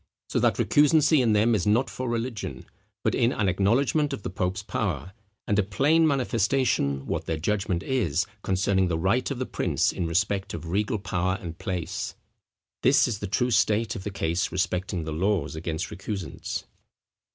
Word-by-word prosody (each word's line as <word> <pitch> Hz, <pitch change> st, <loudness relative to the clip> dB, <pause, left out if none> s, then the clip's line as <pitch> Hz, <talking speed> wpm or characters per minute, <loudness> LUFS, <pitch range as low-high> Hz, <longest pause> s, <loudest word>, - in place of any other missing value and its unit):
So -, -, +1 dB
that -, -, +2 dB
recusancy 150 Hz, 0 st, +4 dB
in 115 Hz, -3 st, +3 dB
them 110 Hz, +3 st, +3 dB
is 100 Hz, -5 st, 0 dB
not 115 Hz, +5 st, +3 dB
for 130 Hz, -1 st, -4 dB
religion, 115 Hz, -2 st, -4 dB, 0.4 s
but -, -, +1 dB
in 120 Hz, -, +2 dB
an 105 Hz, -5 st, 0 dB
acknowledgment 130 Hz, -, +2 dB
of 130 Hz, -, -6 dB
the -, -, -4 dB
pope's 95 Hz, +2 st, -2 dB
power, 90 Hz, -, -3 dB, 0.3 s
and 105 Hz, -, +1 dB
a -, -, +6 dB
plain 145 Hz, +12 st, +3 dB
manifestation 120 Hz, -, +1 dB
what -, -, -3 dB
their 80 Hz, -, -1 dB
judgment 95 Hz, +1 st, -1 dB
is 100 Hz, -, 0 dB, 0.2 s
concerning 95 Hz, 0 st, +1 dB
the 85 Hz, -2 st, 0 dB
right 95 Hz, +9 st, +1 dB
of 140 Hz, -, -3 dB
the 130 Hz, -, -2 dB
prince -, -, 0 dB
in 85 Hz, -, -2 dB
respect 95 Hz, +3 st, 0 dB
of 80 Hz, 0 st, -7 dB
regal 105 Hz, +6 st, 0 dB
power 95 Hz, -1 st, -1 dB
and 85 Hz, -6 st, -8 dB
place." 90 Hz, -6 st, -3 dB, 0.7 s
This -, -, +5 dB
is 110 Hz, -4 st, -3 dB
the 105 Hz, -, -4 dB
true 125 Hz, +6 st, 0 dB
state 110 Hz, +1 st, +2 dB
of 95 Hz, -, -6 dB
the 105 Hz, -, -3 dB
case 85 Hz, -3 st, -1 dB
respecting 90 Hz, -1 st, -1 dB
the 80 Hz, 0 st, -4 dB
laws 95 Hz, +1 st, 0 dB
against 80 Hz, +2 st, -4 dB
recusants. 95 Hz, -4 st, -5 dB
100 Hz, 175 wpm, -26 LUFS, 90-115 Hz, 0.7 s, a